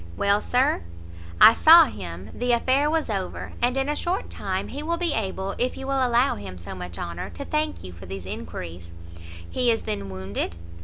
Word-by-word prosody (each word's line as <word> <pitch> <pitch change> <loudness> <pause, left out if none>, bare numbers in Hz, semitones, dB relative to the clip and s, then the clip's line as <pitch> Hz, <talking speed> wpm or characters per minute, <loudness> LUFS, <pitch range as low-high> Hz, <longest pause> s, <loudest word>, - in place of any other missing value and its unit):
"Well, 200 +1 +2
Sir?" 250 +2 +1 0.6
"I 225 - +10
saw 325 +6 +8
him; 90 - -8
the 245 0 0
affair 265 +5 +2
was 320 0 0
over; 195 -5 -4
and 245 +2 +1
in 270 +1 +1
a 295 - 0
short 355 +4 -2
time - - -3
he 290 - -5
will 335 +3 -1
be 340 -3 0
able, 195 -2 -2
if 250 +1 0
you 270 - -6
will 270 -1 +1
allow 245 +2 +3
him 95 -3 -8
so 85 - -8
much 90 -2 -7
honour, 85 +1 -5
to 280 - -8
thank 305 +1 -2
you 90 -1 -9
for 90 +2 -12
these 95 -1 -7
enquiries." 85 0 -7 0.5
"He 250 -1 0
is 225 -1 +1
then 100 -2 -4
wounded?" 95 -2 -4
225 Hz, 200 wpm, -25 LUFS, -, 0.6 s, I